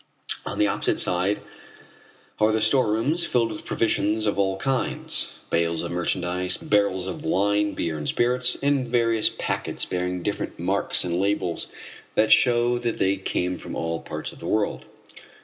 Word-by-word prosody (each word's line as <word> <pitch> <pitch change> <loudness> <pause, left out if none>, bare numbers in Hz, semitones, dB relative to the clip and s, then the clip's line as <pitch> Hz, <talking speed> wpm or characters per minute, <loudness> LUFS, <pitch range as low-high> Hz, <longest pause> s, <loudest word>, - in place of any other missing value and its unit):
On - - -4
the 105 - +4
opposite - - +1
side 90 +3 +2 1.0
are 110 +1 +4
the 110 - +1
storerooms 115 +7 +2
filled 115 -7 +1
with 105 - -8
provisions 110 -1 0
of 100 -1 0
all 95 -1 +1
kinds, 135 +5 -1 0.2
bales 85 0 +1
of 85 - -4
merchandise, 90 +1 -1
barrels 100 -3 +1
of 95 -3 -6
wine, 100 +4 +1
beer, 80 -2 -2
and 75 - -4
spirits 125 +1 +1
and 140 -3 +2
various 115 -2 +2
packets - - -2
bearing 90 0 -2
different 105 - -3
marks - - +1
and 85 -1 -1
labels 100 -4 -1 0.5
that 110 +1 +3
show 120 -1 +4
that 120 -1 -2
they 95 +1 +2
came 90 -1 -2
from - - -7
all 80 0 -2
parts - - -5
of - - -15
the - - -7
world. 105 -1 -1
105 Hz, 160 wpm, -24 LUFS, 90-115 Hz, 1.0 s, the